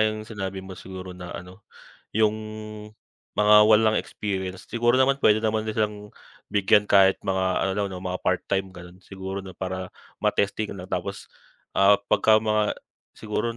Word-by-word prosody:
yung 110 0 -5
sinabi 95 -3 -6
mo 95 - -9
siguro 95 0 -9
na 90 -1 -9
ano, 90 +4 -11 0.5
yung 110 0 +2 1.0
mga 105 0 +6
walang 110 0 +4
experience 95 -2 -4
siguro 120 +2 +2
naman 135 +1 +4
pwede 110 0 +5
naman 110 0 0
din 110 - -3
silang 105 -1 -3 0.4
bigyan 100 +1 +4
kahit 95 -2 +5
mga 95 -1 0
ano 95 - 0
lang 100 0 -1
'no, 95 - -7
mga 90 0 -3
part-time, 95 +1 -1
gano'n, 90 0 -13
siguro 95 0 -6
'no? 95 -2 -11
Para 95 0 -4 0.3
ma-testing 100 +1 0
lang 90 - -8
tapos, 95 +2 -4 0.4
ah, 100 +1 +5 0.2
pagka 110 0 +5
mga 110 -1 +1 0.4
siguro 110 +2 -3
100 Hz, 155 wpm, -25 LUFS, 95-110 Hz, 1.0 s, mga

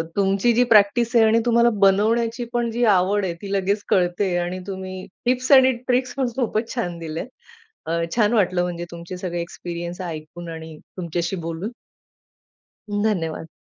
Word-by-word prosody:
तुमची 195 +3 +2
जी 245 +2 +4
प्रॅक्टिस 220 +4 +4
आहे 225 -1 +7
आणि 220 +1 +4
तुम्हाला 235 0 +4
बनवण्याची 225 +5 +2
पण 240 -1 0
जी 240 +2 -1
आवड 195 +2 +2
आहे 175 - -2
ती 200 - -6
लगेच 200 +1 0
कळते 180 0 +1
आणि 175 +1 -2
तुम्ही 190 -1 -6 0.2
टिप्स 255 +2 +1
आणि 260 -1 +8 0.2
ट्रिक्सपण 255 +1 0
खूपच 230 -3 -1
छान 175 -8 -2
दिलेत. 160 +5 -5 0.6
अ, 170 +1 0 0.2
छान 215 -2 +3
वाटलं 185 -5 +2
म्हणजे 175 -1 -3
तुमचे 170 +2 -8
सगळे 180 -1 -4
एक्सपिरियन्स 170 +1 -6
ऐकून 170 0 -7
आणि 160 -1 -8 0.2
तुमच्याशी 175 +1 -2
बोलून. 165 +6 -4 1.2
धन्यवाद. 195 -7 -1
195 Hz, 150 wpm, -22 LUFS, 175-230 Hz, 1.2 s, आणि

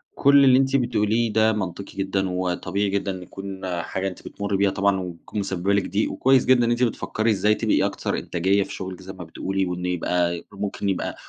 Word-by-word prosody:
كل 140 0 +6
اللي 130 -1 +6
أنتِ 135 0 +2
بتقوليه 115 -3 +1
ده 110 0 +4
منطقي 95 -1 -5
جدًا، 95 -1 -1
وطبيعي 90 +2 -1
جدًا 100 0 -1
إن 95 - -6
يكون 95 +1 -8 0.2
حاجة 95 +3 -3
أنتِ 90 - -7
بتمرّي 100 -1 -2
بيها 100 0 +3
طبعًا، 100 0 +1
وتكون 90 +3 -6
مسببة 95 0 -1
لِك 100 - +1
ضِيق، 100 +4 0
وكويس 130 0 +3
جدًا 125 -2 +4
إن 120 - +1
أنتِ 120 +1 +1
بتفكّري 110 -1 0
إزاي 105 +1 +2
تبقي - - +1
أكثر - - -2
إنتاجية 95 +3 +1
في - - -9
شُغلِك 95 -1 -6
زي 95 +1 -9
ما 90 -2 -9
بتقولي، 95 +4 -2
وإن 90 0 -4
يبقى 90 -1 0
ممكن 100 0 -3
يبقى 95 - -2
100 Hz, 200 wpm, -23 LUFS, 95-105 Hz, 0.2 s, كل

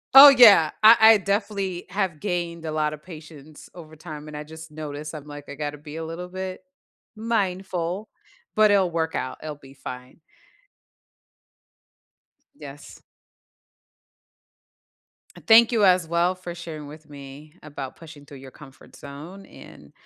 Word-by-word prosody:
Oh 285 +1 +12
yeah, 220 - +7
I 225 +2 +9
I 220 0 +7
definitely 200 -2 -3
have 190 -5 -3
gained 170 -3 -4
a 155 - -4
lotta 155 -1 -2
patience 155 -2 -13
over 155 -3 -13
time 155 -2 -10
and 150 -1 -8
I 150 - -6
just 160 +1 -12
noticed, 150 0 -7
I'm 150 - -9
like, 145 -1 -10
"I 140 - -8
gotta 150 0 -5
be 150 0 -11
a 165 0 -5
little 170 +2 -7
bit 185 0 -7 0.5
mindful," 190 -3 -3 0.5
but 215 0 +5
it'll 190 -3 +2
work 160 -1 -2
out, 130 - -5
it'll 155 -1 -6
be 135 -1 -17
fine. 125 +3 -10 2.4
Yes. 145 - -12 2.4
And - - -16
thank 230 +1 +7
you 225 -3 +1
as 180 -3 +3
well 170 +2 0
for 180 -1 -8
sharing 160 -4 -9
with 155 +1 -14
me 145 +1 -12
about 140 -3 -8
pushing 155 -3 -14
through 140 -1 -13
your 130 0 -13
comfort 135 -2 -16
zone 155 +8 -11
and - - -16
160 Hz, 145 wpm, -23 LUFS, 150-185 Hz, 2.4 s, Oh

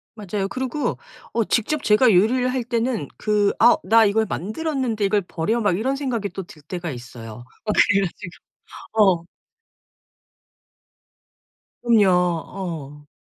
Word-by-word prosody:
맞아요. 205 -2 -3
그러고 260 +6 -3 0.4
어 230 - +2
직접 260 +8 -1
제가 220 +3 +5
요리를 245 +7 +3
할 255 -1 -2
때는 235 - -1
그 210 -1 +1
'아 240 - +6
나 225 +4 +5
이걸 220 +2 +2
만들었는데 230 - -2
이걸 205 +1 +2
버려?' 190 +6 -2
막 205 -5 +1
이런 260 +6 -1
생각이 245 -7 -2
또 195 +1 -6
들 150 - -15
때가 175 +2 -5
있어요. 120 -2 -10 0.2
어 215 - 0
그래 200 -1 +4
가지고 185 -1 -7 0.7
어. - - -21 2.6
음요. 220 -5 +5
어. 170 -4 -2
210 Hz, 245 characters per minute, -22 LUFS, 180-235 Hz, 2.6 s, 아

